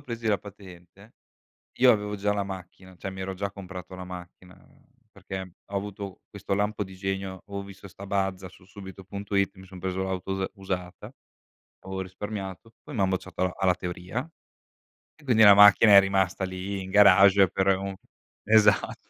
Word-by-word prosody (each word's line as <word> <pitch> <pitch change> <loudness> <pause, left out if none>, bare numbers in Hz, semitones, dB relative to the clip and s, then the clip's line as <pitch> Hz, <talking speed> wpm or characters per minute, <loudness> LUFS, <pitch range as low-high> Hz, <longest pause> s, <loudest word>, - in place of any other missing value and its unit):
presi 115 -4 -6
la 100 - +2
patente 95 +1 -14 0.6
io 125 0 +7
avevo 105 -1 -2
già 105 +1 0
la 100 -1 -1
macchina. 95 -1 -9
Cioè, 95 - -6
mi 95 0 -8
ero 95 0 -4
già 100 +1 -3
comprato 95 -2 -9
la 90 0 -7
macchina 90 0 -11 0.6
perché 95 -1 -7 0.2
ho 100 - -6
avuto 100 -1 -6
questo 100 -1 -4
lampo 105 +1 -1
di 95 - -12
genio, 95 -1 -4
avo 100 0 -5
visto 100 0 -12
sta 100 +1 -11
mazda 95 -2 -2
su 90 0 -19
subito.it 100 +1 -4
mi 95 - -13
son 95 0 -12
preso 95 +1 -3
l'auto 95 0 -4
us 95 0 -1
usata 90 -2 -6 0.7
avevo 95 0 -5
risparmiato, 95 +2 -7
poi 150 - -10
m'han 95 -4 +1
bocciato 95 -2 -4
alla 90 -1 0
alla 95 -1 +3
teoria, 90 - -5 0.9
e - - -24
quindi 115 -4 +4
la 100 -1 +9
macchina 105 +1 +7
è 100 - +11
rimasta 95 -1 0
lì, 95 +1 -5
in 95 - -8
garage 100 -1 +7
per 95 +2 -1
u 95 0 -5 0.5
esatt 105 -1 +4
95 Hz, 170 wpm, -26 LUFS, 95-100 Hz, 0.9 s, è